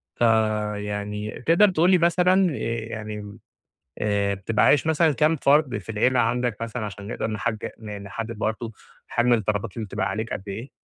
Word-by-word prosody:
فيعني 105 Hz, -2 st, -1 dB
تقدر 175 Hz, +6 st, +6 dB
تقول 175 Hz, 0 st, +3 dB
لي 185 Hz, -, +6 dB
مثلًا 180 Hz, 0 st, +3 dB, 0.3 s
يعني 105 Hz, -2 st, -7 dB, 0.6 s
آآ، 100 Hz, -1 st, 0 dB
بتبقى 100 Hz, +3 st, 0 dB
عايش 145 Hz, +1 st, +4 dB
مثلًا 160 Hz, 0 st, +3 dB
كام 155 Hz, +4 st, +2 dB
فرد 140 Hz, -2 st, +3 dB
في -, -, -13 dB
العيلة 125 Hz, +4 st, +2 dB
عندك 120 Hz, -3 st, 0 dB
مثلًا 115 Hz, 0 st, -4 dB
عشان 100 Hz, 0 st, -8 dB
نقدر 115 Hz, -, -3 dB
نحج 110 Hz, +1 st, -2 dB, 0.2 s
نحدّد 105 Hz, +2 st, -6 dB
برضه 110 Hz, +1 st, -2 dB, 0.4 s
حجم 120 Hz, +1 st, +2 dB
الطلبات 105 Hz, -2 st, 0 dB
اللي 110 Hz, -2 st, -4 dB
بتبقى -, -, -2 dB
عليك 110 Hz, +1 st, -3 dB
قد -, -, -4 dB
إيه؟ 115 Hz, +7 st, -6 dB
110 Hz, 155 wpm, -24 LUFS, 105-140 Hz, 0.6 s, تقدر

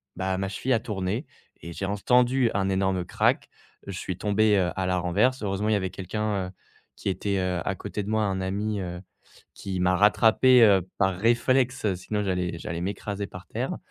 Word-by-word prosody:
bah, 95 Hz, +1 st, -1 dB
ma 95 Hz, 0 st, -2 dB
cheville 125 Hz, +7 st, -1 dB
a 115 Hz, -, +3 dB
tourné 105 Hz, -, -3 dB, 0.4 s
et 85 Hz, 0 st, -8 dB
j'ai 95 Hz, -, -4 dB
entendu 125 Hz, +5 st, +2 dB
un 95 Hz, 0 st, 0 dB
énorme 95 Hz, -1 st, 0 dB
crack. -, -, +1 dB, 0.4 s
Je 100 Hz, -, -5 dB
suis 95 Hz, -1 st, -4 dB
tombé, 105 Hz, 0 st, +2 dB
heu, 90 Hz, -2 st, +1 dB
à 95 Hz, -, -1 dB
la 90 Hz, 0 st, +1 dB
renverse. 90 Hz, +9 st, +1 dB
Heureusement, 105 Hz, +1 st, -1 dB
il -, -, +3 dB
y -, -, +4 dB
avait 95 Hz, -2 st, -1 dB
quelqu'un, 100 Hz, +1 st, -3 dB
heu, 90 Hz, -, -9 dB, 0.4 s
qui -, -, -3 dB
était, 100 Hz, +1 st, -1 dB
heu, 90 Hz, -1 st, -1 dB
à 95 Hz, -, -1 dB
côté 105 Hz, +1 st, -5 dB
de 100 Hz, -, -6 dB
moi, 110 Hz, 0 st, +1 dB
un 95 Hz, -2 st, -1 dB
ami, 100 Hz, +3 st, -2 dB
heu, 90 Hz, 0 st, -6 dB, 0.5 s
qui 95 Hz, -2 st, -5 dB
m'a 90 Hz, +1 st, +3 dB
rattrapé, 115 Hz, +5 st, +5 dB
heu, 95 Hz, -4 st, +5 dB
par 95 Hz, -2 st, +2 dB
réflexe, 120 Hz, 0 st, +2 dB
sinon 105 Hz, +4 st, -3 dB
j'allais 90 Hz, -3 st, -1 dB
j'allais 85 Hz, 0 st, -5 dB
m'écraser 100 Hz, +1 st, -4 dB
par 90 Hz, -1 st, -11 dB
terre. -, -, -3 dB
100 Hz, 200 wpm, -26 LUFS, 95-110 Hz, 0.5 s, rattrapé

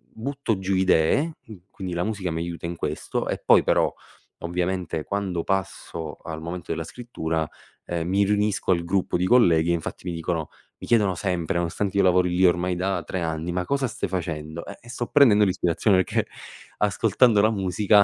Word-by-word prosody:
butto 130 Hz, -2 st, -2 dB
giù 95 Hz, 0 st, -1 dB
idee. 95 Hz, -, +3 dB
Qu 105 Hz, -6 st, -12 dB
quindi 95 Hz, -2 st, -6 dB
la 85 Hz, +1 st, -1 dB
musica 100 Hz, -5 st, -2 dB
mi 80 Hz, +1 st, -2 dB
aiuta 85 Hz, 0 st, -5 dB
in 85 Hz, -, -4 dB
questo -, -, -3 dB
e -, -, -2 dB
poi -, -, +6 dB
però -, -, +2 dB, 0.5 s
ovviamente 90 Hz, -2 st, -2 dB
quando 95 Hz, -4 st, -2 dB
passo 85 Hz, -5 st, -3 dB
al 80 Hz, -1 st, -6 dB
momento 85 Hz, +1 st, -6 dB
della -, -, -2 dB
scrittura, 80 Hz, -10 st, -3 dB, 0.4 s
ehm, 85 Hz, -1 st, -2 dB
mi 100 Hz, +2 st, +2 dB
riunisco 105 Hz, -1 st, +1 dB
al 85 Hz, -1 st, +2 dB
gruppo 95 Hz, +1 st, 0 dB
di 90 Hz, -, 0 dB
colleghi 85 Hz, -8 st, +4 dB
e -, -, +3 dB
infatti 85 Hz, +2 st, -4 dB
mi 85 Hz, -, -2 dB
dicono 80 Hz, -2 st, -2 dB, 0.3 s
mi -, -, -8 dB
chiedono 105 Hz, -6 st, +3 dB
sempre, 90 Hz, -1 st, -2 dB
nonostante 90 Hz, +3 st, -2 dB
io -, -, +5 dB
lavori 90 Hz, -1 st, +4 dB
lì 95 Hz, +1 st, +4 dB
ormai 90 Hz, +1 st, +2 dB
da 95 Hz, +2 st, -1 dB
3 95 Hz, -, -4 dB
anni: 80 Hz, +1 st, -2 dB
"Ma 90 Hz, 0 st, -1 dB
cosa 140 Hz, -2 st, 0 dB
stai 100 Hz, -, -4 dB
facendo?" 80 Hz, -3 st, -4 dB
"Eh, 105 Hz, +4 st, -11 dB
sto 120 Hz, -1 st, -3 dB
prendendo 110 Hz, -8 st, +6 dB
l'ispirazione, 95 Hz, +1 st, +2 dB
perché -, -, -1 dB, 0.5 s
ascoltando 105 Hz, +2 st, +3 dB
la 110 Hz, +1 st, +4 dB
musica, 100 Hz, +1 st, +3 dB
90 Hz, 185 wpm, -24 LUFS, 85-105 Hz, 0.5 s, poi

